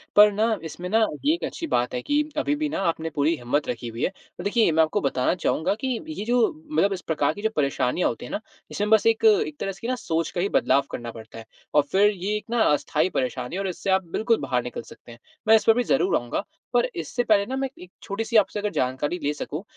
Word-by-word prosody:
पर 210 0 +8
ना 220 +2 +1
इसमें 165 +3 -6
ना 220 - +3 0.3
ये 300 - +5
एक 340 - -4
अच्छी 330 - -5
बात 125 - 0
है 125 - -2
कि 290 - +1 0.2
अभी-भी 300 0 0
ना - - -3
आपने 165 -1 -1
पूरी 155 +2 +1
हिम्मत 135 +4 -1
रखी 120 0 -4
हुई 115 +1 -5
है। - - +2 0.3
तो 175 - -6
देखिए 210 -1 +3
मैं 160 +1 +4
आपको 155 - 0
बताना 135 +1 +1
चाहूँगा 170 -1 0
कि - - +1 0.2
ये 310 -9 -5
जो 245 +1 +2 0.3
मतलब 200 -9 +2
इस 185 - -5
प्रकार 150 -4 0
की 205 - -9
जो 220 - +1
परेशानियाँ 140 +2 +1
होती 115 - -6
हैं - - -9
ना? - - -2 0.3
इसमें 205 +1 -1
बस 220 -1 +5
एक 225 - +2
एक 420 -8 +4
तरह 195 - -2
से 195 - -13
कि 230 - -4
ना 255 - 0
सोच 165 -8 -2
का 175 - -2
ही 195 - 0
बदलाव 135 -6 +3
करना 120 0 -5
पड़ता 115 0 -11
है। 115 - -11 0.3
और 150 - +6
फ़िर 200 +2 +5
ये 200 +1 -3
एक 210 - -9
ना 235 0 +1
अस्थाई 150 +3 +1
परेशानी 125 -1 -2
है 195 - -2
और 195 - -2
इससे 185 +1 -4
आप 190 0 +3
बिल्कुल 225 +4 +2
बाहर 125 -3 0
निकल 125 -1 -5
सकते 120 - -15
हैं। 115 - -13 0.3
मैं 220 - +8
इस 220 - +2
पे 225 - +7
भी 245 +2 +1
ज़रूर 135 - +2
आऊँगा 120 -1 -3 0.3
पर 240 0 +4
इससे 170 - -2
पहले 210 -3 +3
ना 260 +5 -4
मैं 270 0 0
एक 265 - -21
एक 180 - -14
छोटी-सी 225 +4 -4
आपसे 210 0 +2
अगर 210 0 -1
जानकारी 130 +7 -1
ले 145 - +1
सकूँ 150 +3 -5
185 Hz, 260 wpm, -24 LUFS, 140-225 Hz, 0.3 s, पर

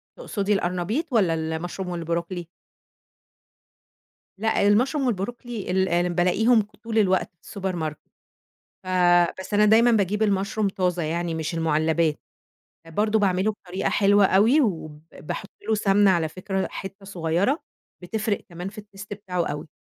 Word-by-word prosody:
تقصُدي 210 - -2
القرنبيط 185 - -1
والّا 190 -8 +3
المشروم 165 +3 -4
والبروكلي؟ 170 +1 -3 1.9
لأ، 215 -1 +1
المشروم 260 +7 +2
والبروكلي 230 -1 -4
ال 180 -2 +1
بالاقيهم 215 +7 +3 0.2
طُول 225 -1 -3
الوقت 190 -3 +2
في 200 - -10
الsupermarket، 170 -5 -2 0.9
ف - - -13 0.5
بس 190 - -7
أنا 210 +1 +5
دايمًا 230 +3 +5
باجيب 210 0 +1
المشروم 200 +1 0
طازة 180 -3 -1
يعني، 165 +1 -2
مش 160 +1 -3
المُعلّبات. 160 0 +1 0.7
برضه 210 +6 +1
باعمله 195 +1 +2
بطريقة 185 -2 -4
حلوة 200 0 +4
أوي، 220 +11 +4
وب 155 - -2
باحُط 150 - -6 0.2
له 220 - +2
سَمنة 200 -1 +4
على 165 -3 +1
فكرة 190 +2 -3
حِتّة 195 +1 -8
صغيرة 185 - 0 0.4
بتفرِق 215 +3 -2
كمان 175 +2 -6
في 210 +1 -10
Taste 205 -1 -12
بتاعه 185 -4 -3
أوي. 150 +2 -5
190 Hz, 130 wpm, -24 LUFS, 175-210 Hz, 1.9 s, أنا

